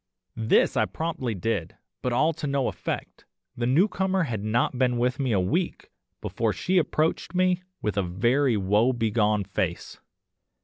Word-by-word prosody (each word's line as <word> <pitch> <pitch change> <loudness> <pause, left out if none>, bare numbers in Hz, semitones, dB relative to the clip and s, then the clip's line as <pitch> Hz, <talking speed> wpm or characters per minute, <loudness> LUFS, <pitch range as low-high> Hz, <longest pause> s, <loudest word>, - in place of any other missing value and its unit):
"This 110 0 +2
I - - +3
promptly 150 -8 -3
did, 95 -4 -2 0.3
but 125 - -1
all 155 +7 +2
to 150 -1 -5
no 140 -2 0
effect. - - -5 0.3
The 120 0 -1
newcomer 190 +5 +2
had 110 -9 -3
not 120 +3 0
been 125 -2 +2
with 125 +2 0
me 130 -3 0
a 100 - +3
week 165 - -2 0.3
before - - -1
she 185 0 +1
approached 160 +2 -1
me 185 0 +2 0.2
with 105 -1 -1
a - - +3
very 120 +8 +1
woe 105 +6 +2
begone 110 -3 +1
face. - - -3
125 Hz, 160 wpm, -26 LUFS, 110-155 Hz, 0.3 s, I